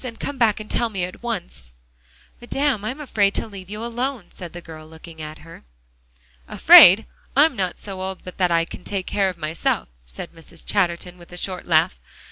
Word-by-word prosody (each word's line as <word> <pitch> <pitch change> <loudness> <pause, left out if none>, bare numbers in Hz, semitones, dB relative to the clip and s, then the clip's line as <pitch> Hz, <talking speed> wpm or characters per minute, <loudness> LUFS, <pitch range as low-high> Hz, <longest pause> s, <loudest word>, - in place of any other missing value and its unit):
And 235 -3 -7
come 285 -2 -4
back 220 -3 +3
and 215 - -8
tell 235 +1 0
me 195 -4 -3
at 180 +1 -6
once." 175 - -6 0.7
"Madame, 265 -2 -1
I'm 255 +7 -4
afraid 205 -9 +1
to - - -1
leave 195 -4 -11
you 210 +3 -5
alone," 240 -2 -4
said 175 -2 -9
the 175 - -8
girl, 160 -2 -11
looking 160 0 -12
at 155 0 -7
her. 165 - -13 0.8
"Afraid? 195 +5 +8 0.3
I'm 295 -1 +5
not 185 -4 -2
so 195 -2 -7
old 190 0 -5
but 180 - -11
that 180 -1 +3
I 165 -1 +2
can 180 - -10
take 195 -2 -3
care 195 -2 +1
of 180 - -7
myself," 155 - -2
said - - -9
Mrs. 165 0 -10
Chatterton 180 -2 -1
with 175 - -15
a 180 - -9
short 185 0 -4
laugh. 155 - +2
185 Hz, 200 wpm, -22 LUFS, 170-220 Hz, 0.8 s, Afraid